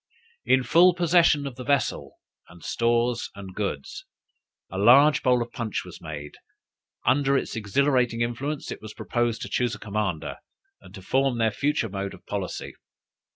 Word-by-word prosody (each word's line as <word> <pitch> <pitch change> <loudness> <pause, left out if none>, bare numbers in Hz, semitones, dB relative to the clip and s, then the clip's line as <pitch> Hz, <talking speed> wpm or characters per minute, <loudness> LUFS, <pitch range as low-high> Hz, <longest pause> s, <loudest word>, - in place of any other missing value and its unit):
In 130 0 +3
full 170 +7 +5
possession 170 -4 +3
of 135 -3 -6
the 125 - -6
vessel 130 - -1 0.3
and 85 0 -15
stores 120 +1 0
and 95 -2 -9
goods, 95 -9 -4 0.7
a 95 - -4
large 140 +8 +6
bowl 125 -3 +3
of 115 - -13
punch 115 -3 -4
was - - -11
made; 75 -2 -8 0.7
under 140 0 +3
its - - -3
exhilarating 125 +2 +1
influence, 130 +6 -3
it - - -7
was 110 0 -10
proposed 120 -2 -1
to - - -5
choose 120 -2 0
a - - -12
commander, 100 -6 -3 0.4
and - - -14
to 95 - -11
form 135 +4 +1
their 115 -1 +2
future 140 +1 0
mode 100 -1 -5
of - - -19
policy. 100 -3 -5
120 Hz, 160 wpm, -25 LUFS, 100-135 Hz, 0.7 s, large